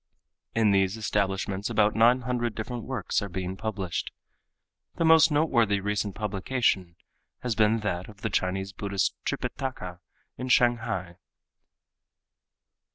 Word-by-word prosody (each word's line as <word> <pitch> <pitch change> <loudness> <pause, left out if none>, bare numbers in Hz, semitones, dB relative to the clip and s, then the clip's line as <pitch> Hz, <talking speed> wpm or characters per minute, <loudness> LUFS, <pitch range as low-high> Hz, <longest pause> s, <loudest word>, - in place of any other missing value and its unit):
In 110 -2 +4
these 95 +1 +2
establishments 100 -2 -1
about 105 -1 +3
nine 120 +3 +5
hundred 120 -2 -2
different 120 +1 -5
works 130 -7 -1
are 100 - -4
being 95 +1 -4
published. 100 -5 -3 0.9
The 165 - 0
most 160 0 +7
noteworthy 120 -10 +2
recent 105 0 -2
publication 100 -3 0 0.5
has 125 -2 0
been 110 +1 +3
that 90 -3 -3
of 105 -1 -15
the 110 - -2
Chinese 95 +1 -1
Buddhist 100 -2 -1
Tripitaka 110 -10 -4 0.4
in 125 - -3
Shanghai. 110 -8 +2
105 Hz, 120 wpm, -27 LUFS, 95-120 Hz, 0.9 s, most